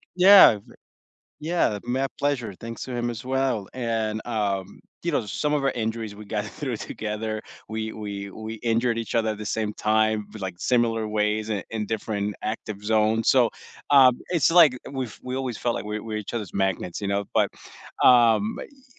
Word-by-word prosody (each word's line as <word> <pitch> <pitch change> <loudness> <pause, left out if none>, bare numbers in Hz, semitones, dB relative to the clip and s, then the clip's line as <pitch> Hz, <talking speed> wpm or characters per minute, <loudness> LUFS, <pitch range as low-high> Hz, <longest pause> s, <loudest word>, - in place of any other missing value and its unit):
Yeah, 185 - +8
v 100 - -17 0.7
Yeah, 155 -9 0
my 130 +3 0
pleasure. 125 -8 -1
Thanks 115 0 -7
to 130 - -6
him 120 0 -1
as 115 -1 -6
well, 130 -5 -1
and, 115 -3 -2
um, 100 -4 -2 0.2
you 170 - -1
know, 120 -7 0
some 150 +9 -1
of 145 - 0
our 135 - +2
injuries, 110 -2 -3
we 105 - -10
got 105 0 -3
through 135 +2 -5
it 110 - -4
together, 110 0 -4 0.3
we 110 0 -4
we 100 -2 -6
we 110 +2 -7 0.2
injured 115 +1 +1
each 115 - -4
other 115 -1 +2
at 105 - -5
the 105 - -6
same 110 0 -1
time, 110 0 +1
v 110 - -10
like, 95 -2 -4
similar 115 -1 +1
ways 105 +1 0
i 100 -3 -1
in 110 -1 -2
different 105 -2 -2
active 105 -2 -4
zones, 110 +1 +2
so, 125 -4 +5 0.4
um, 135 -3 +8 0.2
it's 165 -6 +3
like, 165 -5 +7 0.2
we've 130 -5 -5
we 130 0 -4
always 130 -3 -3
felt 120 -1 0
like - - -4
we 105 0 -4
we're 110 0 -5
each - - -7
other's 105 -6 -4
magnets, 95 -2 -1
you 100 - -1
know, 100 0 +1
but, - - +3 0.5
um, 120 - +6 0.3
ye 270 -3 -23
110 Hz, 195 wpm, -25 LUFS, 105-125 Hz, 0.7 s, Yeah